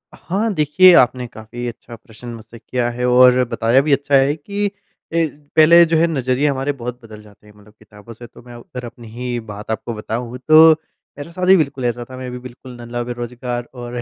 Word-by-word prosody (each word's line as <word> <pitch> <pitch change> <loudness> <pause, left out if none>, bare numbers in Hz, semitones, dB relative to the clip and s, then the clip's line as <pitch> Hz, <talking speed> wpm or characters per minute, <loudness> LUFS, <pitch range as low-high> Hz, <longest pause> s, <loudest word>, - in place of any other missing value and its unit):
हाँ, 205 +5 -2
देखिए 175 +4 +5
आपने 125 0 +2
काफ़ी 115 +2 -8
अच्छा 120 0 -9
प्रश्न 115 +1 -14
मुझसे 115 0 -13
किया 120 0 -2
है 125 +1 -3
और 125 0 +5
बताया 120 +4 +2
भी 145 0 +1
अच्छा 140 +1 +1
है 135 +2 +3
कि 200 +7 -4
अ, - - -6 0.8
पहले 170 +2 +7
जो 165 -1 +1
है 170 +1 +3
नज़रिए 135 -1 0
हमारे 135 0 -1
बहुत 125 +1 -6
बदल 110 -2 -12
जाते 105 0 -20
हैं 105 - -18
मतलब 105 +1 -20
किताबों 105 +1 -15
से 120 +1 -12
तो - - -17
मैं 120 - -13
अ, 120 - -10
अगर 125 +1 -9
अपनी 120 -1 -12
ही 120 0 -4
बात 105 +2 -7
आपको 115 +1 -4
बताऊँ 115 +3 -5
तो 160 +1 +8 0.5
मेरे 145 +3 -9
साथ 180 +2 -3
भी 190 - +7
बिल्कुल 140 -4 -2
ऐसा 120 0 -2
था, 130 - -9
मैं 130 0 -7
भी 125 - -7
बिल्कुल 125 0 -12
नल्ला 120 +1 -5
बेरोज़गार 120 0 -5
और 120 -1 -8
125 Hz, 215 wpm, -18 LUFS, 120-140 Hz, 0.8 s, तो